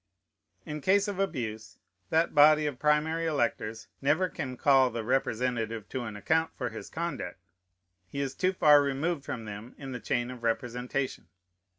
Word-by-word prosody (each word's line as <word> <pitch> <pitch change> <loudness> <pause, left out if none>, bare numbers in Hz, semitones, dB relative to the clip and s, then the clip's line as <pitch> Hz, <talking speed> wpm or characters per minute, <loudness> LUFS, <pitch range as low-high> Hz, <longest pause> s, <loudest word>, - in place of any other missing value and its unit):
In 150 0 -5
case 200 +5 +3
of 200 -2 -4
abuse, 110 - -3 0.3
that 165 +1 +2
body 150 +1 +6
of 140 -4 -3
primary 155 +2 +2
electors 115 -6 -1
never 155 +7 +2
can 130 -6 -5
call 135 -1 +5
the 115 -1 -4
representative 115 -3 -1
to 125 -2 -3
an 110 -2 -6
account 160 +10 +1
for 125 -2 -2
his 110 - -8
conduct. 170 - -4 0.7
He 140 - -6
is 135 -1 -2
too 185 +1 +1
far 150 -5 +6
removed 140 +3 -1
from 115 -5 -5
them 105 +3 -8
in 135 -2 -7
the 125 - -4
chain 120 +1 -1
of 125 -2 -9
representation. 125 +3 -2
135 Hz, 165 wpm, -29 LUFS, 120-155 Hz, 0.7 s, body